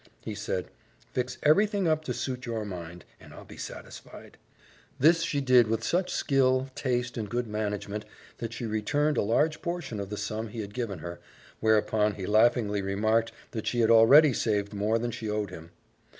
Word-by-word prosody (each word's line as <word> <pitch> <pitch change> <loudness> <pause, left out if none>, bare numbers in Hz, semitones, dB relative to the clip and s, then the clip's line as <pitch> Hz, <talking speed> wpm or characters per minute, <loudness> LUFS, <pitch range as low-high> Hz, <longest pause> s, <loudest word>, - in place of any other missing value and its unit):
He 110 - -5
said, 100 -3 -4 0.4
"fix 125 0 -2
everything 200 +4 +3
up 155 -1 +1
to 125 - -2
suit 125 -2 -4
your 115 -2 -3
mind, 90 -3 -8
and - - -14
I'll - - -11
be - - -12
satisfied." - - -10 0.6
This 165 +5 +5
she 145 -4 -1
did 125 -3 +5
with 115 +1 -1
such 180 +6 0
skill, 130 -1 +1
taste, 125 -2 -2
and 105 -3 -4
good 120 +1 -1
management 105 -1 -3 0.3
that 115 -1 -4
she 120 - -5
returned 145 +8 0
a - - +3
large 150 +9 +1
portion 170 -11 -4
of 100 -1 -5
the 105 - -5
sum 110 +2 -3
he 110 +1 -6
had 100 -1 -8
given 115 -6 -3
her, 85 +2 -7 0.4
whereupon 105 -1 +2
he 95 - -5
laughingly 110 -1 +3
remarked 110 +4 +1 0.2
that 110 - -5
she 120 - +1
had 115 0 +4
already 135 +6 +7
saved 105 -3 -1
more 105 +2 +1
than 120 +1 -2
she 115 -1 -5
owed 105 -2 -2
him. 80 -2 -10
115 Hz, 185 wpm, -28 LUFS, 105-130 Hz, 0.6 s, already